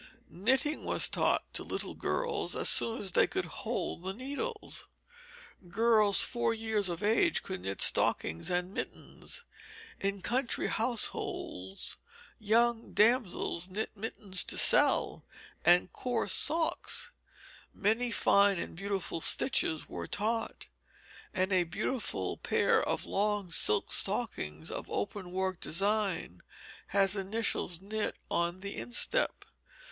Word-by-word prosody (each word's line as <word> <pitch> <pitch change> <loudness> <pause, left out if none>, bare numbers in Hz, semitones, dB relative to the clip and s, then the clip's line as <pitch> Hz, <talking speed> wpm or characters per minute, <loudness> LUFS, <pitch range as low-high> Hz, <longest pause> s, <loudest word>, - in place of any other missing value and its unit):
Knitting 260 - 0
was - - +4
taught - - +2
to - - -1
little - - -4
girls 470 -4 -1
as - - +3
soon 230 +2 +4
as 195 -2 -3
they - - +4
could 380 0 -3
hold - - -4
the 190 +2 -4
needles. 285 - -4 0.8
Girls 215 +1 +4
four 235 -1 0
years 220 -3 0
of 170 +2 -5
age 225 +11 +2
could 190 -1 -5
knit 95 0 -4
stockings 80 +1 +2
and 180 +1 -1
mittens. 475 - -5 0.5
In 195 -1 -3
country 250 0 -1
households 205 - -2 0.4
young 230 +2 +1
damsels 210 -5 +2
knit 210 +4 -3
mittens 200 -3 -2
to - - -1
sell - - +4 0.4
and 175 +2 +4
coarse 245 -2 -1
socks. 320 +1 +2 0.6
Many 225 +4 0
fine 200 -3 +3
and - - -5
beautiful 195 -3 -3
stitches 160 - +1
were - - -6
taught, 225 +4 -2 0.7
and 185 +1 -1
a 185 -1 +4
beautiful 170 - -3
pair - - +2
of - - -2
long 205 -2 -1
silk 105 - +4
stockings 75 +2 -1
of - - -6
open 180 - -4
work 185 -1 -2
design 195 - -1 0.5
has 195 0 +3
initials 195 -3 -1
knit 210 +2 -3 0.2
on 170 +2 0
the 200 0 -6
instep. - - 0
205 Hz, 120 wpm, -31 LUFS, 180-230 Hz, 0.8 s, was